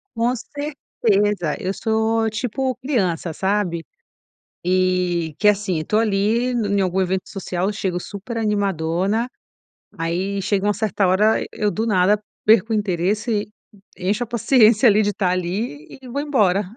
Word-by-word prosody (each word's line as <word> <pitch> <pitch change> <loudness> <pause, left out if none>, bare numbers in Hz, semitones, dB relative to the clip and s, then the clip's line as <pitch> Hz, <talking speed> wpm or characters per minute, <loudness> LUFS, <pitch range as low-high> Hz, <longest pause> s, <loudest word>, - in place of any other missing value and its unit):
Com 235 +2 +1
certeza, 210 - -1
eu 185 +1 -2
sou 220 +1 0
tipo 250 +4 -2
criança, 185 - -1
sabe, 190 -4 -1 0.8
e, 180 -3 +1
que 210 - +4
assim 195 -5 +1
tô 210 - +1
ali 225 +3 +1
em 205 -4 0
algum 185 0 +1
evento 185 0 0
social, 190 0 -2
chego 190 -3 -2
super 205 +6 -7
animadona, 200 +1 0 0.7
aí 180 +4 -2
chega 200 0 0
uma 210 - +3
certa 205 -1 0
hora, 210 +4 +3
eu 210 -1 -1
do 220 - -2
nada, 205 -1 +3 0.3
perco 225 +1 +5
o - - +2
interesse, 205 +3 0 0.5
encho 205 +6 -1
a 240 - -7
paciência 235 -1 +4
ali 210 0 +5
de 205 - +1
estar 195 -2 0
ali, 180 -3 -3
e 260 - -11
vou 280 +4 -3
embora 210 -10 +2
205 Hz, 145 wpm, -21 LUFS, 185-225 Hz, 0.8 s, perco